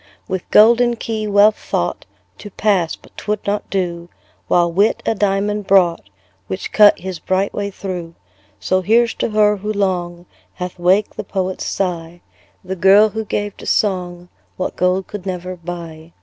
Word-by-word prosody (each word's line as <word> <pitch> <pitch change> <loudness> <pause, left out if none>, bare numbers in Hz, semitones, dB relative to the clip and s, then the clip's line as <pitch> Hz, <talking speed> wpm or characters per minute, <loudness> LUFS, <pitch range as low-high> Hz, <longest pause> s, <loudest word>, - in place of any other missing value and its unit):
With 185 -2 -4
golden 235 +3 +5
key 220 -1 -4
Wealth 205 +1 +4
thought 85 - -3 0.3
To 205 - -9
pass 195 -5 0
but - - -22
'twould 210 0 -3
not 205 +1 -2
do: 175 -3 -3 0.4
While 175 -1 +2
Wit 200 +6 +1
a - - +2
diamond 205 0 -1
brought, 175 - +3 0.4
Which 95 - -5
cut 210 -1 +6
his 185 -1 -6
bright 190 +3 -1
way 200 -1 -3
through. 180 -4 -6 0.4
So 185 0 0
here's 230 +4 +3
to - - -2
her, 210 -1 +3
who 210 +2 -4
long 180 -4 -2 0.3
Hath 180 -1 -6
waked 190 +4 +2
the - - -3
poet's 190 -1 -3
sigh, 175 -2 -3 0.4
The 190 +1 -4
girl, 195 +4 +5
who 220 +1 -4
gave 205 0 -3
to - - -10
song 180 -3 -1 0.3
What 185 - -3
gold 180 +1 +1
could 200 -2 -8
never 180 0 -4
buy. 170 -2 -9
190 Hz, 165 wpm, -18 LUFS, 175-210 Hz, 0.4 s, cut